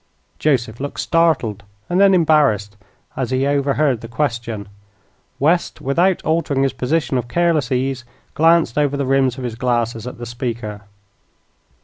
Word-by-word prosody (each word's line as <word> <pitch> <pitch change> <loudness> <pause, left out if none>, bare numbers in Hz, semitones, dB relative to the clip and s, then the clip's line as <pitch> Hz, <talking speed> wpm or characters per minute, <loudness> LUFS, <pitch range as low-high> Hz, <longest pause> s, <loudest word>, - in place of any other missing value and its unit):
Joseph 120 -6 0
looked 140 +1 -5
startled, 160 - +1 0.3
and 175 +1 0
then 195 -1 +6
embarrassed, 145 - +2 0.4
as 130 -3 -2
he 130 +1 0
overheard 140 -2 +1
the 115 - -8
question. 115 -5 -3 0.7
West, 165 +5 +1
without 170 +7 +1
altering 155 -4 +1
his 135 - 0
position 140 -1 0
of 120 - -5
careless 165 -3 +1
ease, 130 0 -1 0.3
glanced 165 -5 +3
over 145 -1 +1
the 140 - -1
rims 130 -1 +2
of 130 - -6
his 120 -2 -3
glasses 120 -1 -1
at 125 - -7
the 120 - -7
speaker. 115 -3 -5
135 Hz, 145 wpm, -19 LUFS, 120-155 Hz, 0.7 s, then